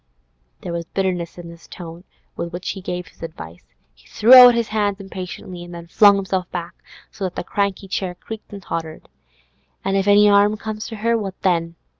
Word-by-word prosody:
There 175 - -5
was 170 0 -4
bitterness 180 -2 -2
in 175 -1 -9
the 170 - -11
tone 170 +1 -11 0.3
with 170 - -5
which 180 +1 -5
he 195 - -8
gave 180 -1 -4
this - - -21
advice; 85 - -9 0.3
he - - -24
threw 230 +4 +4
out 250 -2 +11
his 235 -2 -1
hands 205 -2 0
impatiently, 185 -2 -8
and 175 0 -10
then 170 0 -9
flung 200 +4 +6
himself 190 -2 -2
back, 175 0 -5 0.4
so 200 - -8
that 180 - -5
the - - -3
cranky 200 +1 -2
chair 185 -1 -3
creaked 220 +4 -10
and 200 -2 -9
tottered. 160 -3 -6 0.8
'An' 195 - 0
if 195 0 +1
'arm 205 +1 +5
comes 215 0 -6
to 225 - -7
her, 230 +2 0
what 195 -4 -4
then? 170 -3 +1
190 Hz, 195 wpm, -21 LUFS, 170-205 Hz, 0.8 s, out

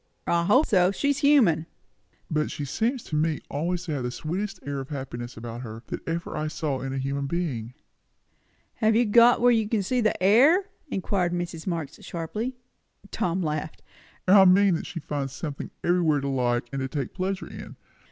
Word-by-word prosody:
"I 170 0 +1
hope 255 - +5
so. 185 -5 +4
She's 280 +6 0
human." 220 - +4 0.6
"But 150 -1 0
she 145 - -4
seems 230 - -1
to 155 - -5
me 155 0 +1
always 170 +5 -1
to 175 - -5
have 140 - -2
the 125 - -2
sweetest 185 +9 -4
air 140 -1 -3
of 135 - -7
happiness 125 -5 -6
about 115 +1 -7
her, 115 -1 -8
that - - -4
ever 170 +1 -3
I 155 - -2
saw 150 -4 -2
in 135 - -4
a 135 - -3
human 140 +1 -2
being." 135 -8 -3 1.0
"Have 220 0 +3
you 240 +2 +4
got 235 +3 +6
where 245 0 +6
you 220 -3 +2
can 220 -3 +1
see 245 +5 0 0.2
air?" 270 - +5 0.2
inquired 190 -6 -1
Mrs. 175 -1 -4
Marx 165 -5 -3
sharply. 210 +10 -4 0.6
Tom 180 +1 -1
laughed. 155 0 -4 0.4
"I 195 +1 +8
mean, 190 +1 +5
that 165 - -3
she 170 - -5
finds 140 -3 -4
something 145 -1 -5
everywhere 170 -5 +2
to 140 - -2
like 120 -2 0
and 135 - -2
to 130 - -1
take 135 -2 -4
pleasure 190 +1 -2
in. - - -10
170 Hz, 185 wpm, -26 LUFS, 140-200 Hz, 1.0 s, I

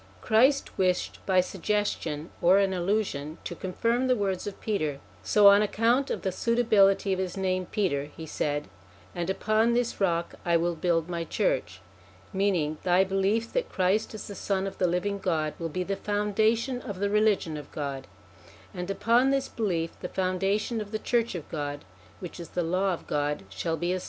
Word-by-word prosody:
Christ 245 - +2
wished 185 -1 0
by 185 -1 +5
suggestion, 180 -5 -2
or 180 +3 +6
an 195 -1 +2
allusion, 175 -5 -1
to - - -5
confirm 230 +8 -1
the 255 - +4
words 195 -4 -2
of 200 - -6
Peter; 155 -10 -2 0.2
so 200 - +5
on 200 +1 +6
account 230 +6 +2
of - - -3
the 190 - 0
suitability 205 -3 +3
of 185 - -2
his 190 +1 -3
name, 185 -1 -1
Peter, 160 -9 0
he 150 +2 -10
said: 145 -1 -2 0.2
' 90 +1 -25
and 175 +1 -2
upon 215 +4 +2
this 240 -3 -1
rock 170 -3 +1
I 170 -1 +3
will 170 +1 0
build 165 0 0
my 170 -1 -3
church,' - - -1 0.5
meaning, 180 -6 0
thy 180 +1 +4
belief 195 +4 0
that - - -1
Christ 195 +4 0
is 215 - -7
the 205 - -7
son 195 -1 -1
of 195 0 -6
the 180 - +3
living 200 +3 -1
God, 160 -5 0
will 165 -1 -3
be 180 +4 -2
the 195 +2 -2
founda 210 +2 +1
tion 250 +1 -3
of 205 -6 -6
the 200 0 0
Religion 210 -6 +2
of 150 -1 -8
God; 140 -2 -4 0.7
and 180 +1 -5
upon 230 +6 +3
this 275 0 +1
belief 170 -7 -1
the 180 - -5
foundation 195 +5 0
of 205 - -7
the 215 - -2
church 235 -1 0
of 165 - -6
God 145 - -5 0.3
which 180 -1 -8
is 170 - -8
the 175 - -1
Law 185 +4 +1
of 175 - -5
God 145 -2 -1
shall 165 - -2
be 175 +2 -1
established. 185 - 0
190 Hz, 190 wpm, -27 LUFS, 170-210 Hz, 0.7 s, or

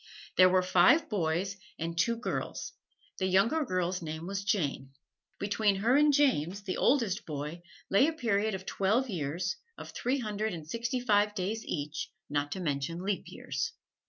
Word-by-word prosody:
There 185 0 +7
were 185 0 +3
five 185 - +5
boys 190 +1 0 0.2
and 165 +1 -3
two 230 +8 +2
girls, 235 - -4 0.5
and 190 - +1
the - - -2
younger 230 +12 +3
girl's 185 -5 -1
name 160 0 -5
was 195 +1 -3
Jane. 145 -9 -1 0.4
Between 205 0 +1
her 225 +6 +2
and 295 +1 +6
James, 205 - +2
the 185 - -3
oldest 235 -8 +2
boy, 150 +2 -5 0.3
lay 200 +9 +5
a 325 - 0
period 220 -7 0
of 190 0 -7
twelve 220 +8 +1
years 170 +2 -2 0.2
of - - -8
three 255 +3 -1
hundred 215 -3 -2
and 155 -2 -9
sixty 235 - -2
five 210 -3 +2
days 215 +4 -2
each, 150 -1 -3 0.2
not 145 0 0
to - - -5
mention 165 +1 -2
leap 200 0 -1
years. 140 -6 -4
190 Hz, 170 wpm, -30 LUFS, 170-220 Hz, 0.5 s, There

